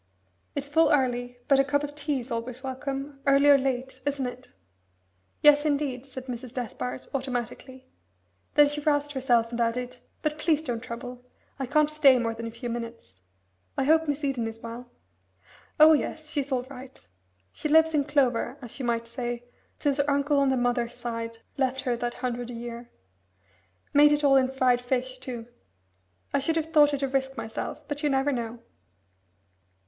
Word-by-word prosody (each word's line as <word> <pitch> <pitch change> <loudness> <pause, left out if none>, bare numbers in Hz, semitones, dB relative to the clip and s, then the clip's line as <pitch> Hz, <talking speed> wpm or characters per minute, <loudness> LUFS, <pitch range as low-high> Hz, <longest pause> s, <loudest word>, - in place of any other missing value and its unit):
It's 285 0 -3
full 325 +3 +4
early, 245 -3 +1
but 275 -1 +5
a - - +6
cup 285 +1 0
of 290 0 -5
tea's 285 -4 -3
always 240 +2 -4
welcome, 275 +1 -4
early 275 +1 +5
or 285 - +9
late, 260 0 -2
isn't 280 -1 -1
it?" 250 +1 -7 1.0
"Yes, 295 0 +7
indeed," 280 -4 -1
said 260 -1 -8
Mrs. 250 -1 -7
Despard, 130 - -4
automatically. 260 0 -4 0.7
Then 295 -1 +7
she 295 +1 -3
roused 290 -1 +1
herself 245 -4 +2
and 235 0 -2
added, 250 +2 -1 0.3
"But 305 0 -1
please 310 -1 +2
don't 240 -6 -2
trouble, 245 +1 -7 0.4
I 270 - -2
can't 300 +2 +3
stay 300 -4 +5
more 230 -2 -1
than 230 0 -6
a - - -6
few 240 +2 -6
minutes. 230 - -7 0.6
I - - +2
hope 320 +3 +4
Miss 290 +1 -2
Eden 260 -5 0
is 225 0 -7
well?" 235 +1 -8 0.9
"Oh, 310 +1 +9
yes 310 0 -2
she's 285 -2 -2
all 255 -2 +1
right. 260 0 -11 0.5
She 305 - -4
lives 320 +1 +5
in 290 -2 +2
clover, 265 -3 +1
as 245 +1 -9
you 260 - -3
might 235 -1 0
say, 240 0 -4 0.3
since 285 -1 0
her 285 0 +1
uncle 285 +1 +2
on 275 -1 +3
the 265 - +2
mother's 245 -1 0
side 230 -1 -5 0.2
left 265 -1 0
her 250 -3 0
that 240 0 -3
hundred 245 -1 -3
a 245 - -6
year. 235 0 -7 1.0
Made 295 +1 +7
it 295 0 +2
all 275 -1 +5
in 260 -1 +4
fried 255 -2 +2
fish, 255 +1 -2
too. 245 -3 -6 0.9
I 280 - +3
should 320 +4 +1
have 320 0 -2
thought 295 -1 +6
it 275 - -4
a - - +2
risk 265 0 -1
myself, 225 0 -5
but 290 0 -4
you 300 - +1
never 270 +1 +2
know." 235 -2 -4
260 Hz, 180 wpm, -27 LUFS, 240-285 Hz, 1.0 s, or